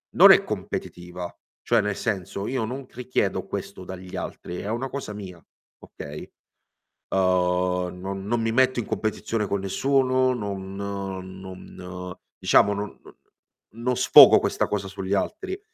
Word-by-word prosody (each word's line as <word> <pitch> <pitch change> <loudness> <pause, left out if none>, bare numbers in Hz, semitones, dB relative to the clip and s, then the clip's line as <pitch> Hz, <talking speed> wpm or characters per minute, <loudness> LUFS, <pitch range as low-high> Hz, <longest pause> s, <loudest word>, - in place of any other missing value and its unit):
non - - +10
è - - +7
competitiva, 90 0 -5 0.3
cioè - - +3
nel 105 -1 -2
senso, 100 -2 -3
io 130 -2 -1
non 130 +4 -5
richiedo 125 +1 -1
questo - - -6
dagli 95 0 -8
altri, 90 +1 -6
è 100 - -5
una 120 +4 -2
cosa 140 -5 -5
mia, 95 -4 -9 0.4
okay, 75 +1 -9 0.9
uhm, 90 -1 +1
non 95 +1 -5
non 115 +3 0
mi 115 0 0
metto 130 +1 +3
in 115 - -2
competizione 110 0 -2
con 100 - -1
nessuno, 130 +5 +2
non 100 -4 -5
non 95 -2 -7 0.2
diciamo 105 - +4 1.0
non 120 +3 -1
sfogo 130 - +9
questa - - 0
cosa 100 -2 -2
sugli 95 0 -4
altri. 380 - -3
100 Hz, 135 wpm, -25 LUFS, 95-120 Hz, 1.0 s, non